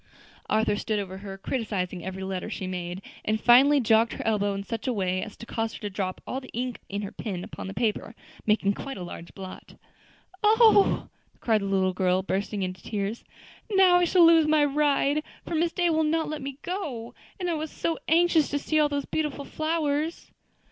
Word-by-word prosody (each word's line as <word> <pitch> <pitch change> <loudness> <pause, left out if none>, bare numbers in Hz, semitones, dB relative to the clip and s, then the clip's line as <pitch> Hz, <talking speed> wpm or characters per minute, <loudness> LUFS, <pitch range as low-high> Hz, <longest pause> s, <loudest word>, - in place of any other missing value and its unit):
Arthur 215 -1 +2
stood 215 0 -1
over 190 -2 -4
her 195 -1 -8
criticising 195 -6 -3
every 190 +1 -5
letter 190 -1 -4
she 190 - -4
made, 180 0 -5 0.2
and 215 0 0
finally 270 +6 +6
jogged 225 -1 +3
her - - -6
elbow 205 -2 +1
in 195 - -4
such 225 +3 -5
a 255 - +1
way 185 -3 0
as 215 - -7
to 230 - -9
cause 225 -1 -3
her - - -8
to 205 -2 -5
drop 185 -1 -3
all 265 - -4
the 255 - -12
ink 250 0 -3
in 200 +1 -3
her 200 - -5
pen 185 -5 -5
upon - - -7
the 195 - -6
paper, 220 -1 -1 0.3
making 210 -2 +3
quite 270 +4 -6
a 180 - -5
large 170 -1 -9
blot. 190 -1 -10 0.7
"Oh!" 435 -1 +5 0.3
cried 220 -3 +2
the - - -3
little 190 -1 +1
girl, 185 0 +1
bursting 195 +1 -2
into 185 0 -5
tears, 210 +1 -3 0.5
"now 380 -3 +6
I 355 - +3
shall 345 0 +5
lose 330 -2 +6
my 305 -1 +4
ride, 290 0 +2 0.2
for - - -5
Miss 330 +1 +1
Day 350 0 +1
will 315 0 +2
not 320 +1 +1
let 310 0 -4
me 270 0 -6
go; 290 - -4 0.3
and 360 - -2
I 345 - +1
was 310 0 -3
so 330 +2 -2
anxious 330 -2 +4
to 290 - 0
see 310 +2 0
all 300 -1 +4
those 285 -1 -2
beautiful 295 -3 -2
flowers." 310 0 -2
230 Hz, 205 wpm, -26 LUFS, 195-310 Hz, 0.7 s, finally